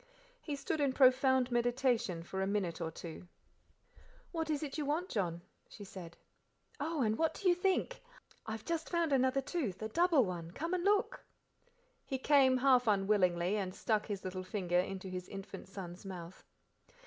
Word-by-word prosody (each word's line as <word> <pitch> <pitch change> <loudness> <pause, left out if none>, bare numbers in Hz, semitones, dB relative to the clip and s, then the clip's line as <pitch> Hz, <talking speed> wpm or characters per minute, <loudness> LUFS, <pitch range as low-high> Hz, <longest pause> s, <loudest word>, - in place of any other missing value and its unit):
He 295 - -4
stood 295 +2 -2
in 275 -2 +2
profound 260 -1 +4
meditation 240 -7 +1
for 190 +2 -4
a 190 - 0
minute 185 -4 -1
or 165 - -1
two. 165 +2 -9 1.0
"What 325 -2 -2
is 300 -1 0
it 280 -2 -5
you 305 - -1
want, 310 +6 -1
John?" 175 -5 -1 0.3
she 205 - -10
said. 180 -3 -10 0.6
"Oh! 305 -1 -1
and 215 0 0
what 320 -1 +1
do 395 - -1
you 355 - +7
think? 380 +7 0 0.5
I 220 - -2
have 220 -1 -7
just 330 -1 -2
found 340 -4 +1
another 260 +1 +3
tooth, 265 - -3
a 220 - -4
double 335 -1 +4
one 175 -3 -5
come 330 - -3
and 360 -1 0
look." 420 +5 +1 0.8
He 265 - -3
came, 265 -1 +5
half 255 -2 +4
unwillingly, 195 -2 +2
and 185 -2 -3
stuck 215 -2 0
his 200 -3 -4
little 185 0 -4
finger 180 -2 0
into 190 +1 -3
his 180 -1 -6
infant 195 -1 -8
son's 185 -2 -8
mouth. 180 -2 -8
230 Hz, 175 wpm, -34 LUFS, 185-290 Hz, 1.0 s, you